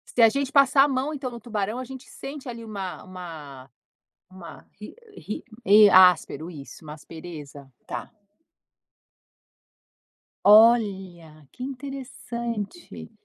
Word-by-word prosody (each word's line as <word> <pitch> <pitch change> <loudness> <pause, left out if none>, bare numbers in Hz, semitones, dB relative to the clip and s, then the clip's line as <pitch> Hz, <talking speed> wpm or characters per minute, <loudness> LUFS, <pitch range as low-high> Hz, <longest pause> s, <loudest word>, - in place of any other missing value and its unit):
Se 240 - +3
a 225 - +9
gente 275 +3 -2
passar 275 -1 +5
a - - +3
mão 270 +3 -2
então 265 -3 -5
no 235 - -9
tubarão, 215 0 -4
a 255 - -6
gente 260 0 -11
sente 275 -1 -9
ali 230 -1 -8
uma 195 -4 -6
uma 155 -8 -10 0.6
uma 185 -2 -13
ri 210 - -10 0.2
ri 215 - -7 0.5
áspero, 180 -2 +4
isso, 145 -1 -11
uma 150 -1 -9
aspereza, 150 -3 -11
tá. - - -6 2.4
Olha, 195 - +3
que 250 - -9
interessante. 255 - -7
210 Hz, 120 wpm, -24 LUFS, 170-255 Hz, 2.4 s, a